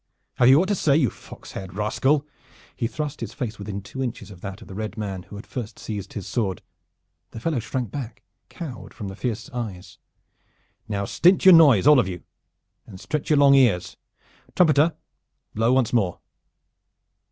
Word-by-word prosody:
Have 120 - +5
you 135 +3 +7
aught 185 - +1
to - - +3
say, 150 -7 +2
you 130 - +2
fox - - -13
haired 95 -1 -8
rascal?" 135 +8 +1 0.5
He 115 - -1
thrust 150 +2 -5
his 115 0 -6
face 120 -7 -5
within 100 -1 -6
two 135 +6 -7
inches 115 -5 -5
of 90 -3 -13
that 100 +1 -7
of - - -16
the 95 - -9
red 110 +3 -5
man 100 -4 -4
who 100 - -12
had 100 - -9
first 115 -4 -6
seized 100 -3 -6
his 100 - -6
sword. 95 -3 -2 0.7
The 115 - -9
fellow 155 +1 -1
shrank 120 -1 -4
back, 130 -5 -7 0.3
cowed, 125 - -8
from 105 -4 -6
his 95 - -10
fierce 120 -1 -3
eyes. 110 -8 -6 0.9
"Now 100 -2 -2
stint 180 - +3
your 190 - +10
noise, 145 - +7
all 150 -2 +7
of 105 - +1
you, 90 -2 -6 0.6
and 95 -4 -11
stretch 150 +7 -4
your 150 - +4
long 140 -1 +6
ears. 120 -10 +3 0.6
Trumpeter, 155 -2 +4 0.6
blow 115 +3 +2
once 125 -3 +2
more!" 100 -7 +1
115 Hz, 185 wpm, -24 LUFS, 100-140 Hz, 0.9 s, your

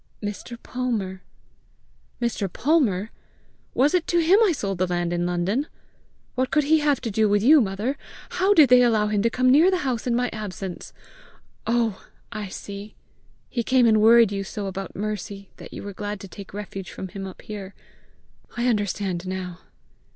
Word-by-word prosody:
"Mr. 210 +3 -6
Palmer." 215 -7 -3 1.0
"Mr. 225 -6 -1
Palmer! 230 - +1 0.6
Was 280 +6 +3
it 360 -2 +1
to 345 - +1
him 340 +5 +5
I 410 - +4
sold 195 - -3
the 185 - +2
land 175 -1 -1
in 175 0 0
London? 185 - 0 0.7
What 255 +1 0
could 300 - +2
he 315 +2 +4
have 295 -3 +2
to 230 - -3
do 215 +1 +2
with 205 0 +2
you, 295 +4 +7
mother? 210 +6 -2 0.3
How 375 +3 +2
did 300 -6 +7
they 250 0 +7
allow 220 -3 +3
him 210 -1 +1
to 230 - +2
come 255 +2 +2
near 315 +7 +6
the 365 -5 0
house 250 -2 -2
in 240 - +2
my 245 0 +1
absence? 195 -4 -6 0.8
Oh, 230 -3 0 0.3
I 215 -2 -5
see! 200 +2 -8 0.5
He 240 - -2
came 255 +1 +3
and 220 -2 +4
worried 230 -1 +6
you 195 -1 -2
so 200 +1 -5
about 195 0 -5
Mercy 200 -1 -5
that - - -11
you - - -8
were 200 0 -6
glad 205 +1 -5
to 195 - -8
take 195 +1 -11
refuge 195 -2 -7
from 190 - -7
him 195 +1 -6
up 185 - -11
here! 200 -2 -8 0.8
I 240 - 0
understand 200 -5 -1
now!" 185 -1 -5
210 Hz, 180 wpm, -24 LUFS, 195-250 Hz, 1.0 s, you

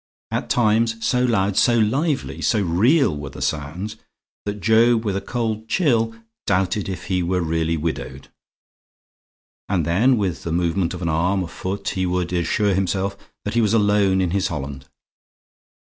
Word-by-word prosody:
At - - -2
times, 115 0 +2
so 125 0 +2
loud, 100 -5 +1
so 120 +3 +4
lively, 135 +7 0
so 110 - +2
real 105 - +3
were 75 -1 -6
the - - -11
sounds, 85 +9 -3 0.5
that 105 0 -3
Job, 115 +3 +4
with 100 -2 0
a 100 - -1
cold 110 -1 -3
chill, 115 -8 +1 0.3
doubted 95 +1 0
if 90 -2 -5
he 90 -2 0
were 90 +1 0
really 80 0 0
widowed. 70 -4 -4 1.4
And 90 -5 +1
then, 115 - +3
with 95 -5 -1
the 85 - -4
movement 85 +1 0
of 90 - -7
an 85 - 0
arm, 90 +5 +1
a - - -5
foot, 95 +4 -4
he 95 -1 -1
would 90 0 -1
assure 100 +4 +1
himself 95 +1 -1 0.3
that 105 - -2
he 120 - +3
was 110 0 +2
alone 100 -3 +3
in 90 -2 0
his 100 0 +1
holland. 70 -4 -6
95 Hz, 165 wpm, -22 LUFS, 85-110 Hz, 1.4 s, so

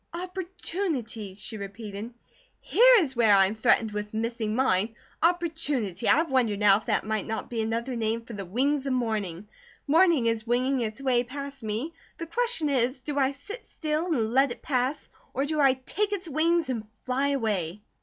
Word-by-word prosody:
"Opportunity," 340 - -3
she 215 +2 -5
repeated. 205 +2 -7 0.5
"Here - - +6
is 295 - +1
where 225 -4 +5
I 195 -1 +6
am 195 - -1
threatened 220 -1 +2
with 210 +1 -5
missing 225 -1 -2
mine. 220 -3 +1 0.3
Opportunity! 315 - 0
I 320 - +5
wonder 255 -9 +1
now 200 -1 +6
if 215 - -10
that - - +1
might 215 -2 -2
not 220 +2 -4
be 230 -2 -1
another 230 +3 -2
name 225 0 -1
for 230 - -10
'the 200 -2 -5
wings 270 +8 0
of 265 - 0
morning.' 210 -6 -2 0.4
Morning 325 -3 +4
is 230 0 0
winging 255 +2 +1
its 220 +2 -3
way 250 -2 +2
past 280 +2 -7
me, 225 +9 -3 0.2
the 335 - -5
question 470 -2 +1
is: 255 -1 0
do 285 0 -2
I 265 0 +3
sit 345 - -9
still 310 +2 -3
and 235 -9 0
let 270 +2 +4
it 240 - -8
pass, 265 +1 -1 0.3
or 270 +2 +1
do 305 +1 -1
I 270 -2 +5
take 400 +11 -2
its 380 -3 -3
wings 330 +2 +1
and 220 -4 -3 0.2
fly 260 +2 +1
away?" 210 - -1
250 Hz, 185 wpm, -27 LUFS, 220-300 Hz, 0.5 s, Here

